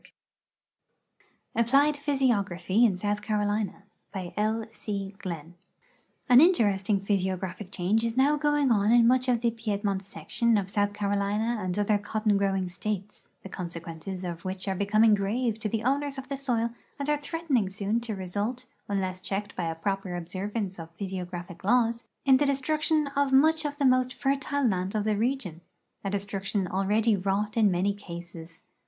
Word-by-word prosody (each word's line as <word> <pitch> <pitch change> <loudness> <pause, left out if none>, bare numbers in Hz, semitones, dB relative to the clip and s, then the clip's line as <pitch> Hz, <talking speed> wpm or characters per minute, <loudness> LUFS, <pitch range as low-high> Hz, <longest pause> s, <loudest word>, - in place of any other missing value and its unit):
] - - -40
APPLIED 275 +6 +4
PHYSIOGRAPHY 235 - +1
IN 195 -6 +2
SOUTH 205 +2 -1
CAROLINA 205 -1 -1 0.3
B}^ 185 -2 -5
L. 220 +1 0
C. 200 -3 -4
Gli:>x 170 -6 -5
• - - -17 0.7
An 250 -1 +8
interesting 205 - +3
phj'siographic 190 -1 -2
change 200 +4 0
is 230 +1 -2
now 280 +3 +4
going 295 -2 +2
on 210 -1 +3
in 240 -1 +6
much 255 +2 +3
of 240 -2 +2
the 235 -1 +2
Piedmont 205 -3 -2
section 235 +3 0
of 195 -1 -2
South 205 0 +1
Carolina 205 +3 0
and 185 0 -2
other 205 0 +2
cotton 215 +1 0
growing 195 -2 +1
states, 200 +2 -5 0.2
the 195 - -8
consequences 170 +1 -6
of 170 -2 -5
which 185 +1 -4
are 195 - +1
becoming 215 +3 +4
grave 220 +3 0
to 215 - -2
the 225 +1 -2
owners 280 +2 0
of 265 -1 -7
the 280 - -2
soil 235 -4 0 0.3
and 280 -1 -3
are 295 -1 +1
threatening 290 - 0
soon 205 +3 -1
to 230 -2 -4
result, 205 +7 -3 0.2
un 200 -1 +1
less 185 0 -4
checked 200 +2 -4
by 175 - -2
a 165 - -3
proper 195 +1 -2
observance 190 +3 -4
of 165 0 -10
ph3'siogra])hic 180 -2 -6
laws, 235 +2 +2 0.2
in 265 -1 +7
the 285 +1 +2
destruction 305 +3 +1
of 280 -1 +2
much 315 +4 +4
of 290 0 -3
the 285 - +1
most 255 0 +3
fertile 275 0 0
land 190 -1 -1
of 210 - +1
the 215 0 +1
region 215 - -2 0.2
— - - -48
a 195 - -1
destruction 200 0 -2
already 210 +4 +2
wrought 200 +2 -1
in 220 -3 +4
many 190 +2 +1
cases. 170 -4 -10
205 Hz, 170 wpm, -28 LUFS, 190-240 Hz, 0.7 s, An